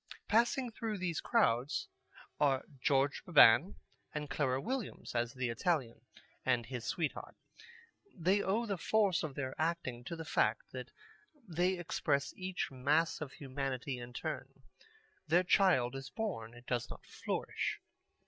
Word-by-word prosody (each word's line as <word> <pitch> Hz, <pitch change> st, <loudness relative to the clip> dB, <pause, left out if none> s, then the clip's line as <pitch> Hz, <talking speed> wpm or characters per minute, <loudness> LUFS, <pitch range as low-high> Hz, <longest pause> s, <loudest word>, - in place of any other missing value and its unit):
Passing 235 Hz, +3 st, +2 dB
through 220 Hz, -1 st, -3 dB
these 180 Hz, -4 st, -2 dB
crowds 120 Hz, +5 st, +2 dB, 0.5 s
are 135 Hz, -3 st, +3 dB
George 135 Hz, +1 st, +2 dB
Beban 170 Hz, -, +7 dB, 0.4 s
and 150 Hz, -2 st, -4 dB
Clara 135 Hz, -2 st, +1 dB
Williams 245 Hz, -, -4 dB
as 120 Hz, 0 st, 0 dB
The 130 Hz, -2 st, -2 dB
Italian 120 Hz, -3 st, 0 dB, 0.4 s
and 125 Hz, -3 st, +2 dB
his 120 Hz, -1 st, -5 dB
sweetheart. 155 Hz, +5 st, -3 dB, 0.8 s
They 190 Hz, +2 st, +2 dB
owe 215 Hz, +5 st, +1 dB
the 200 Hz, -5 st, -2 dB
force 200 Hz, -4 st, +3 dB
of 150 Hz, -4 st, -4 dB
their 130 Hz, -2 st, -3 dB
acting 155 Hz, -7 st, -1 dB
to 170 Hz, -, -4 dB
the 165 Hz, -1 st, -6 dB
fact -, -, +1 dB
that -, -, -6 dB, 0.6 s
they 180 Hz, +2 st, +1 dB
express 140 Hz, -5 st, 0 dB
each 185 Hz, -4 st, -3 dB
mass 145 Hz, +6 st, +1 dB
of 145 Hz, -3 st, -5 dB
humanity 135 Hz, -1 st, -3 dB
in 120 Hz, 0 st, -8 dB
turn. -, -, -5 dB, 0.6 s
Their 175 Hz, +2 st, +4 dB
child 175 Hz, -10 st, +4 dB
is 135 Hz, 0 st, -6 dB
born. 120 Hz, -, -4 dB
It 120 Hz, +1 st, -14 dB
does 120 Hz, -2 st, -1 dB
not -, -, -10 dB
flourish. -, -, -3 dB
145 Hz, 140 wpm, -34 LUFS, 130-185 Hz, 0.8 s, Beban